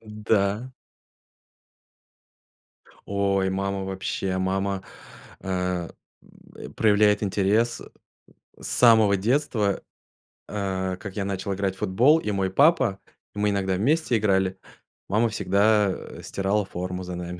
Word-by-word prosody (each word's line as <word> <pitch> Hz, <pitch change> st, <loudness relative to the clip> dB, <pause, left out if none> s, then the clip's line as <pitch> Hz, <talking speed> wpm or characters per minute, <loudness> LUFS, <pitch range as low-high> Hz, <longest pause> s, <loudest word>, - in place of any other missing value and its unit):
Д 105 Hz, -1 st, -11 dB
да. 105 Hz, +4 st, +1 dB, 2.3 s
Ой, 100 Hz, -1 st, 0 dB
мама 95 Hz, 0 st, -2 dB
вообще 95 Hz, 0 st, -3 dB
мама, 95 Hz, +1 st, -1 dB, 0.6 s
э, -, -, -9 dB
м, 90 Hz, -2 st, -2 dB, 0.7 s
э, -, -, -8 dB
проявляет 105 Hz, -1 st, +3 dB
интерес, 105 Hz, +4 st, +1 dB
э, -, -, -11 dB, 0.7 s
с -, -, -6 dB
самого 110 Hz, -4 st, +5 dB
детства, 110 Hz, -2 st, 0 dB, 0.7 s
а, 95 Hz, -2 st, -2 dB
как 95 Hz, -1 st, -9 dB
я 100 Hz, -, -1 dB
начал 100 Hz, 0 st, -3 dB
играть 95 Hz, -1 st, -2 dB
в -, -, -19 dB
футбол, 115 Hz, +10 st, +4 dB
и 105 Hz, -, -3 dB
мой 95 Hz, -1 st, 0 dB
папа 135 Hz, -, +3 dB, 0.4 s
и 105 Hz, -, -5 dB
мы 105 Hz, -, +2 dB
иногда 95 Hz, -1 st, 0 dB
вместе 130 Hz, -, +1 dB
играли, 95 Hz, -3 st, +1 dB, 0.5 s
мама 110 Hz, +3 st, +2 dB
всегда, 105 Hz, 0 st, +2 dB
э, -, -, -8 dB
стирала 100 Hz, +1 st, -1 dB
форму 90 Hz, 0 st, -5 dB
за 90 Hz, 0 st, -6 dB
нами. 90 Hz, 0 st, -6 dB
100 Hz, 130 wpm, -25 LUFS, 95-105 Hz, 2.3 s, самого